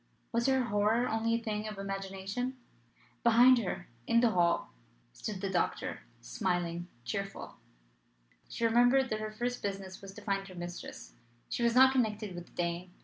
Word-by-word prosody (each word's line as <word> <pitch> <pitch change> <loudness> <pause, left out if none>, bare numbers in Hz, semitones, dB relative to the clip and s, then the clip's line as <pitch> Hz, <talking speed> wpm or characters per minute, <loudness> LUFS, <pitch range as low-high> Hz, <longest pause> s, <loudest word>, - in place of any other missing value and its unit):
Was 235 +2 +1
her 265 -1 +3
horror 215 +2 +2
only 225 +1 +1
a 230 - -3
thing 215 -1 -2
of 210 -2 -6
imagination? 195 +6 -4 0.6
Behind 240 +2 +7
her, 180 -4 -4 0.2
in 235 - +5
the 235 -1 +4
hall, 175 -2 +2 0.4
stood 200 - -5
the 195 - -1
doctor, 180 - -1 0.2
smiling, 175 - -2 0.2
cheerful. 195 - -4 0.9
She 230 - -1
remembered 245 +3 +4
that 215 - -1
her 215 0 -3
first 245 +3 -3
business 195 -2 -5
was 195 -1 -9
to 210 - -9
find 195 -1 -1
her 185 - -11
mistress. 175 0 -7 0.4
She - - -2
was 235 0 +3
not 260 +1 +8
connected 215 -6 0
with 175 0 -8
the - - -21
Dane. 175 +1 -2
210 Hz, 165 wpm, -32 LUFS, 190-235 Hz, 0.9 s, not